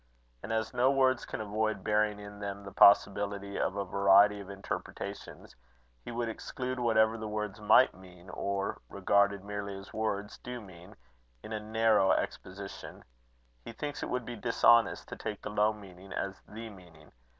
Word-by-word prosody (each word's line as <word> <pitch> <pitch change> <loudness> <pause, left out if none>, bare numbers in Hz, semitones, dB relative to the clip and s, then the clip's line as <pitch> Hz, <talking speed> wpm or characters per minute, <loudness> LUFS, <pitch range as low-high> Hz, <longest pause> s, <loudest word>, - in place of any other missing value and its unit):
And - - -6
as 110 0 -1
no 125 +2 +3
words 130 -2 +2
can - - -5
avoid 110 -1 -1
bearing 105 -1 +1
in 105 0 -10
them 100 0 -5
the 100 - -9
possibility 100 0 +4
of - - 0
a 100 -1 -2
variety 100 +2 +5
of 100 -1 -9
interpretations, 100 0 -7 0.5
he - - -7
would 120 0 -2
exclude 125 +3 -4
whatever 110 -1 +3
the 110 - -4
words 105 0 -4
might 110 +5 +6
mean, 90 -1 -15
or, 100 +1 -3
regarded 100 0 +2
merely 100 -1 -5
as 95 0 -12
words, 105 -2 -3
do 125 0 -6
mean, 95 -1 -13 0.5
in 110 - -7
a 110 - -2
narrow 110 -2 +3
exposition: 95 +1 -5 0.6
he - - -8
thinks 145 +4 -5
it - - -3
would 125 -1 -2
be 120 - -6
dishonest 115 +1 +3
to - - -6
take 105 -1 -5
the 105 - -5
low 105 +1 +3
meaning 95 -2 -12
as 95 0 -4
the 110 +1 -8
meaning. 90 -5 -16
105 Hz, 170 wpm, -31 LUFS, 100-110 Hz, 0.6 s, might